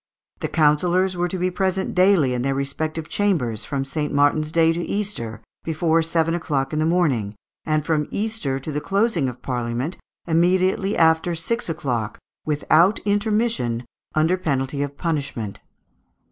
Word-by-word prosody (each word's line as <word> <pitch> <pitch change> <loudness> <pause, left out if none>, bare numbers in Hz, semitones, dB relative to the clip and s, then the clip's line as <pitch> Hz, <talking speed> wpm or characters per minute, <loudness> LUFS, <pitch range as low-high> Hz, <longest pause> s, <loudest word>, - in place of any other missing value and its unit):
The - - -2
councillors 175 +5 +2
were 175 0 0
to 185 - -4
be 185 +1 0
present 190 +1 -1
daily 180 -8 +4
in 125 - -1
their 135 +1 0
respective 155 +3 -3
chambers, 155 - 0
from 135 -1 -2
St. 150 +2 -2
Martin's 145 +2 +2
day 165 0 +4
to 170 - -3
Easter, 170 - -3 0.2
before 160 +1 +1
seven 165 0 +1
o'clock 145 -5 -1
in 155 - 0
the 155 - +2
morning; 135 - +1 0.3
and 155 -1 0
from 155 -3 +1
Easter 210 -11 -2
to 135 +3 -6
the 150 0 -2
closing 195 - +1
of 125 - -11
Parliament, 125 +5 -2 0.3
immediately 185 +4 +2
after 160 +1 +3
six 230 +7 -2
o'clock, 125 -9 -2 0.3
without 155 +6 +3
intermission, 205 - 0 0.3
under 160 +4 +3
penalty 140 -5 -1
of 140 0 -4
punishment. 140 - -3
160 Hz, 150 wpm, -22 LUFS, 140-180 Hz, 0.3 s, daily